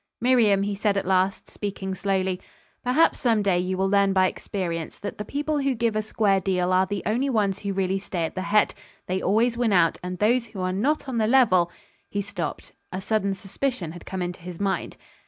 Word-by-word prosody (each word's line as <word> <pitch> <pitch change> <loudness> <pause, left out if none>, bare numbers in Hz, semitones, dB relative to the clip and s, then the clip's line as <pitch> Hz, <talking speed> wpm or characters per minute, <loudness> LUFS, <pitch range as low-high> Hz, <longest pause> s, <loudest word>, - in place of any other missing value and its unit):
"Miriam," 225 -5 +4
he 205 0 -1
said 200 0 0
at 195 - -1
last, 190 +1 +1
speaking 195 -2 -4
slowly, 190 -1 -1 0.4
"perhaps, 255 +7 +3
some 225 -5 +2
day, 190 -3 +2
you 185 +1 -1
will 190 +1 +1
learn 200 0 +3
by 190 -1 +4
experience 170 -4 -3
that 205 - -6
the - - -2
people 295 +5 -2
who 275 -2 +1
give 230 -1 0
a 215 - +2
square 210 -2 +2
deal 185 -1 +1
are 185 +1 +3
the 200 0 -3
only 245 +6 +1
ones 205 -6 +1
who 200 - -3
really 190 0 0
stay 180 -4 -2
at - - -5
the 185 - -3
head. 205 +2 +3 0.3
They 185 +1 -2
always 230 +4 +2
win 230 -4 +2
out; 170 -3 +3
and 180 0 -5
those 235 +4 +2
who 210 -4 -7
are 185 0 -1
not 275 +11 0
on 250 -3 -1
the 215 - +2
level 210 -9 +4 0.2
" - - -38
He 200 - -1
stopped. 205 +1 -5 0.2
A 185 - -3
sudden 200 -1 0
suspicion 195 - -3
had 175 +1 -11
come 190 -1 -3
into 175 0 -5
his 175 0 -8
mind. 195 -4 -2
200 Hz, 220 wpm, -25 LUFS, 185-220 Hz, 0.4 s, Miriam